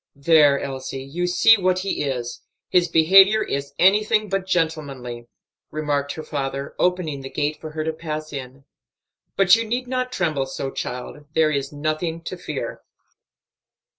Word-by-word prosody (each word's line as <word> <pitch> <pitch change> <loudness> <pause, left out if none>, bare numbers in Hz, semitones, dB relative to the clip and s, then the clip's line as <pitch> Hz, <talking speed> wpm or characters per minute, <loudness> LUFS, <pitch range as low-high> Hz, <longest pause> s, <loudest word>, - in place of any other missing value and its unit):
"There, 145 -1 +5
Elsie, 135 -1 -5
you 170 +6 -3
see 225 +5 +5
what 185 -1 +1
he 190 -3 -2
is; 125 -4 -4 0.3
his 180 -1 +3
behavior 195 +6 +6
is 140 0 -4
anything 210 +3 +3
but 195 -1 -2
gentlemanly," 140 -9 -2 0.4
remarked 145 -2 -2
her 155 - -7
father, 140 -2 -4
opening 180 -6 0
the 135 - -7
gate 150 +1 -2
for 155 - -6
her 155 0 -2
to 160 0 -2
pass 155 -1 -6
in. 135 0 -8 0.7
"But 190 -1 +6
you 230 - -1
need 245 +3 -3
not 255 0 -2
tremble 155 - -1
so, 135 0 -4
child; 125 +4 -6
there 155 -1 +4
is 140 -1 -2
nothing 155 +3 -3
to 185 - -5
fear." 150 -9 -5
155 Hz, 155 wpm, -22 LUFS, 140-180 Hz, 0.7 s, behavior